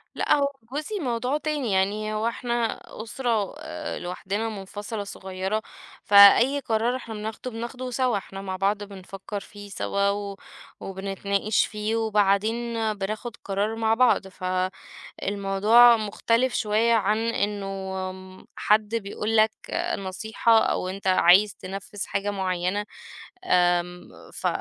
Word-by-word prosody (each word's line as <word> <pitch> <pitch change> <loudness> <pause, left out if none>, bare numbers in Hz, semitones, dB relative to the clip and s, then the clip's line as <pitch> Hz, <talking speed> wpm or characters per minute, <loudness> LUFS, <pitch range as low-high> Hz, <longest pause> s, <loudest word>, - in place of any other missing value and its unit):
لأ - - +2
هو 280 -1 +2 0.3
جوزي 345 +8 -3
موضوع 250 0 -1
تاني 295 -7 -2
يعني 205 +3 0
هو 215 +1 0
إحنا 235 -1 -1 0.2
أُسرة 230 -3 -1
آآ - - -6
لوحدنا 195 +5 -3
منفصلة 205 +1 -6
صغيّرة، 190 +1 -4 0.4
فأي 205 +7 +7
قرار 230 0 0
إحنا 230 -3 -7
بناخده 220 +4 -5
بناخده 245 +3 -6
سوا 250 -3 +1
إحنا 195 0 -8
مع 190 -1 -4
بعض 200 +2 0
بنفكّر 195 +1 -7
فيه 205 0 -12
سوا 200 0 0
و 200 0 -3 0.4
وبنتناقش 195 +2 -1
فيه 215 +1 -3
وبعدين 220 +2 +1 0.2
بناخد 210 +3 -5
القرار 205 +3 -2
مع 225 0 +1
بعض، 235 -4 +3 0.7
فالموضوع 205 +4 +4
مختلف 230 +4 0
شوية 220 +2 +2
عن 210 0 +2
إنه 210 -3 -1 0.5
م 185 0 -13
حد 215 +1 +2
بيقول 215 +1 -2
لك 215 0 +5 0.5
نصيحة 220 +4 +1
أو 185 - -1
أنت 195 +1 -7
عايز 185 +2 +5
تنفّذ 195 +2 -7
حاجة 200 +1 -2
معيّنة، 190 +1 -1 0.6
آمم 180 - +1 0.3
ف - - -4
210 Hz, 125 wpm, -25 LUFS, 195-230 Hz, 0.7 s, فأي